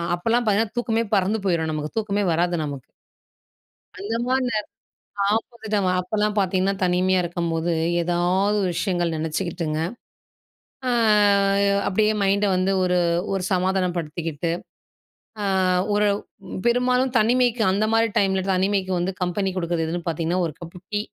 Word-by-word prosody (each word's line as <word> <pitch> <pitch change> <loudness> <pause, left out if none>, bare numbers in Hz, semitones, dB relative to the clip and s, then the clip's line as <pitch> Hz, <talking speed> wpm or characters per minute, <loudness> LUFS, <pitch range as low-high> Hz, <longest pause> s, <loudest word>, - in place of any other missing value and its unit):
அப்போலாம் 230 +7 +1
பார்த்திங்கன்னா, 215 +2 +1
தூக்கமே 230 -1 0
பறந்து 195 +3 +1
போய்ரும் 165 -3 0
நமக்கு 150 +4 -5
தூக்கமே 205 -2 0
வராது 175 +1 +1
நமக்கு. 140 -3 -7 1.1
அந்த 210 +4 -3
மாரி 260 +1 +1
நேர 215 -2 -1 0.7
ஆப்போசிட்டா 225 -2 -3 0.2
அப்போலாம் 210 +3 -1
பார்த்தீங்கன்னா, 190 +1 +1
தனிமையா 180 +1 +2
இருக்கும்போது 170 -1 -2 0.3
ஏதாவது 180 +4 +1 0.2
விஷயங்கள் 175 -2 -1
நெனைச்சுக்கிட்டுங்க. 160 0 -2 1.1
ஆ - - +2 1.0
அப்படியே 215 +2 +2
மைண்ட 200 +1 +2
வந்து 185 +1 +1
ஒரு 180 0 +2 0.4
ஒரு 190 -1 -1
சமாதானப்படுத்திக்கிட்டு 170 -4 -1 0.9
அ, - - -2 0.5
ஒரு 210 0 +2 0.6
பெரும்பாலும் 250 +1 +2
தனிமைக்கு 240 +1 +2
அந்த 205 +3 +1
மாரி 225 0 +4
டைமில 190 -1 +2
தனிமைக்கு 190 0 0
வந்து 180 +2 -1
கம்பெனி 190 +2 0
குடுக்குறது 170 -2 -1
எதுன்னு 175 +1 -4
பார்த்தீங்கன்னா, 165 +3 -1
ஒரு 155 - -9
கப்பு 170 +1 -9
டீ. 205 - +1
185 Hz, 120 wpm, -23 LUFS, 175-210 Hz, 1.1 s, மாரி